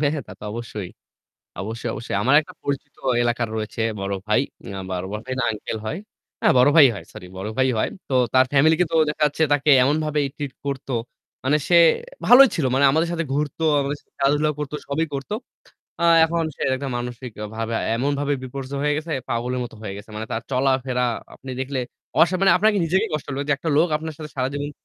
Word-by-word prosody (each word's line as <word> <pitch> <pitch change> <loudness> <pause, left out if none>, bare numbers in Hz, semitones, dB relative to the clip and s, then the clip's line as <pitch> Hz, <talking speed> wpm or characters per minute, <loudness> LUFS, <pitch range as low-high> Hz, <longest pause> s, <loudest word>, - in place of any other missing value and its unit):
হ্যা, 145 - +3
হ্যাঁ। 145 -5 -4
তাতো - - -12
অবশ্যই। 110 -5 -6 0.7
অবশ্যই, 115 +4 -4
অবশ্যই। 115 - -4
আমার 130 +5 +3
একটা 155 - -12
পরিচিত 140 -1 -4 0.3
এলাকার 120 -1 0
রয়েছে 110 +1 -3 0.2
বড় 100 0 -2
ভাই। 105 - +3 0.4
আ - - -4
বড় 90 0 -3 0.2
ভাই 130 - -4
না - - +1
আঙ্কেল 110 0 -5
হয়। 150 - -3 0.4
হ্যাঁ - - +4
বড় 125 +3 +6
ভাই 155 -4 +10
হয় 100 - -8
সরি 90 - -10
বড় 95 +3 -4
ভাই 130 0 +3
হয়। - - +1 0.2
তো 135 - -1 0.2
তার 130 0 +6
ফ্যামিলি 150 +3 +5
কে - - +6
তো - - 0
দেখা 150 +1 -3
যাচ্ছে 150 +2 -1
তাকে 145 +1 +3
এমনভাবে 150 +2 +1 0.2
ট্রিট 145 -3 -5
করত। 140 -1 -4 0.6
মানে 140 +3 +3
সে 175 - +5 0.5
ভালোই 265 +2 +9
ছিল। 160 - -1
মানে 135 +2 +3
আমাদের 160 +4 +1
সাথে 170 -1 -1
ঘুরত 145 +1 -2 0.2
আমাদের 140 +1 -2
সাথে - - -39
খেলাধুলা 150 +2 +2
করত, 150 -1 -4 0.2
সবই 155 +3 0
করত। 135 -1 -5 0.7
আ - - -1 0.2
এখন 165 +1 0
সে - - -6
একটা 135 +1 -4
মানসিকভাবে 115 -2 -5 0.2
এমনভাবে 140 +3 0
বিপর্যয় 135 +1 -5
হয়ে 150 0 +2
গেছে 155 +2 -5 0.2
পাগলের 125 +2 -1
মতো 120 - -10
হয়ে 100 -3 -5
গেছে। 105 +2 -11
মানে 110 +1 -4
তার 115 - -2
চলাফেরা 130 -1 +1 0.3
আপনি 130 - -10
দেখলে 135 0 -3 0.4
অস 170 - +7
মানে 195 0 +5
আপনার 215 +4 +4
নিজেকেই 180 +4 +1
কষ্ট 150 -2 -3
হবে 135 +1 -2
যে 150 - +4
একটা 160 - -4
লোক 165 +3 +4
আপনার 160 0 -6
সাথে 155 -1 -7
সারাজীবন 145 +3 -2
135 Hz, 200 wpm, -23 LUFS, 120-150 Hz, 0.7 s, ভাই